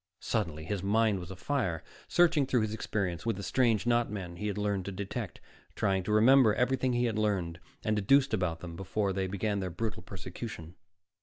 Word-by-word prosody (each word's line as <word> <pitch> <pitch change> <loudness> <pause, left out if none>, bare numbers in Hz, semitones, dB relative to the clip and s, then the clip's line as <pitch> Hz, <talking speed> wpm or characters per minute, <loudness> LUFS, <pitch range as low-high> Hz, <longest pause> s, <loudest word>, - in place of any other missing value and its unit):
Suddenly, 85 -8 -2
his 100 +2 -2
mind 105 +1 +2
was 90 -1 -8
afire, 95 - -2 0.2
searching 165 -6 +4
through 125 -3 +2
his 110 0 -1
experience 100 -5 -2
with 115 -2 0
the 100 - -6
strange 115 -2 +2
not 120 -1 +2
men 90 -4 -6
he 105 - -3
had 105 -1 -2
learned 100 -3 -1
to 100 - -4
detect, 100 +2 -5 0.4
trying 95 -2 +1
to 95 - -3
remember 110 +1 +6
everything 130 0 +1
he 120 0 +2
had 110 -2 0
learned 95 -6 0 0.2
and 110 - +1
deduced 130 +6 +3
about 90 -5 0
them 85 -2 -7
before 95 +2 -1
they 95 0 -1
began 100 +2 -1
their 95 -1 -2
brutal 110 +6 -4
persecution. 90 -2 -8
105 Hz, 190 wpm, -30 LUFS, 95-115 Hz, 0.4 s, remember